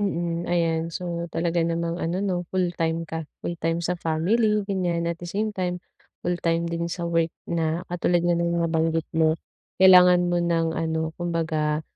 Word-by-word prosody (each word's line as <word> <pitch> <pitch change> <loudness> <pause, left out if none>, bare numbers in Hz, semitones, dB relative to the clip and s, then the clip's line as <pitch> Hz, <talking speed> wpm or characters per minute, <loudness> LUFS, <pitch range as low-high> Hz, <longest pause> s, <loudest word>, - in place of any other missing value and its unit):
Mm. 175 -3 -1
Ayan, 165 -2 +1
so 170 -1 -3
talaga 170 +1 -1
namang 170 0 -1
ano 180 +4 -1
no, 190 -3 0 0.2
fulltime 165 -3 0
ka, 160 -1 -5 0.2
fulltime 165 0 -2
sa 180 +1 -1
family, 210 +7 +1
ganyan, 175 -4 -1
at 170 - -5
the 175 - -8
same 210 +5 -1
time 180 -3 -3 0.4
full-time 170 -1 0
din 170 0 -2
sa 175 - -4
work. 165 -1 +1 0.2
Na 165 0 0
katulad 175 0 +1
nga 175 - +3
ng 170 0 0
nabanggit 165 0 +1
mo, 160 -1 +3 0.5
kailangan 180 -1 +8
mo 175 - +2
ng 170 -1 +1
ano, 160 0 -1
kumbaga 160 -3 -1
170 Hz, 160 wpm, -25 LUFS, 165-175 Hz, 0.5 s, kailangan